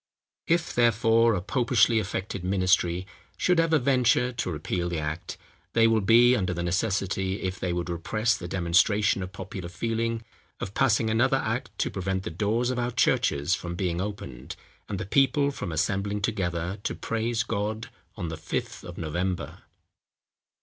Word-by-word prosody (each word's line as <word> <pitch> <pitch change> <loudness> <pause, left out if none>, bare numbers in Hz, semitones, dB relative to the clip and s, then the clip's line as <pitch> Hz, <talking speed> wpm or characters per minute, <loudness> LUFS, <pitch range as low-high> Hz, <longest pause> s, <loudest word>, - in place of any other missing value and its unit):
If, 170 0 +1
therefore, 115 -1 +4
a 90 - -3
popishly 115 -1 +3
affected 100 -2 -4
ministry 90 -1 +2 0.3
should 180 -2 +2
ever 165 -1 +4
venture 125 -2 +3
to 110 -6 -2
repeal 85 +3 -2
the 85 - -2
act, 75 +2 -4 0.4
they 115 -1 +5
will 115 -1 +4
be 120 +5 +6
under 90 -6 -1
the 85 - -2
necessity, 95 +1 -1
if 95 -1 -3
they 90 - -1
would 85 0 -2
repress 110 +7 0
the 85 - -6
demonstration 95 +4 +2
of 90 0 -5
popular 95 -2 -7
feeling, 115 +4 -2 0.4
of 95 - -5
passing 115 -3 +2
another 120 +4 +3
act - - -2
to - - -1
prevent 95 0 -2
the - - -4
doors 110 +8 0
of 125 - -2
our 120 0 0
churches 80 - +2
from 85 -1 -3
being 90 -1 -1
opened, 95 -12 -6 0.3
and 100 - -3
the 95 - -3
people 140 +5 +3
from 100 -10 -5
assembling 100 +5 -1
together 95 -3 -2
to - - -3
praise 115 0 -1
God 110 +1 -3 0.2
on 90 -6 -4
the 80 - -5
"Fifth 80 - -4
of 85 -1 -9
November." 85 +3 -3
100 Hz, 165 wpm, -27 LUFS, 90-115 Hz, 0.4 s, be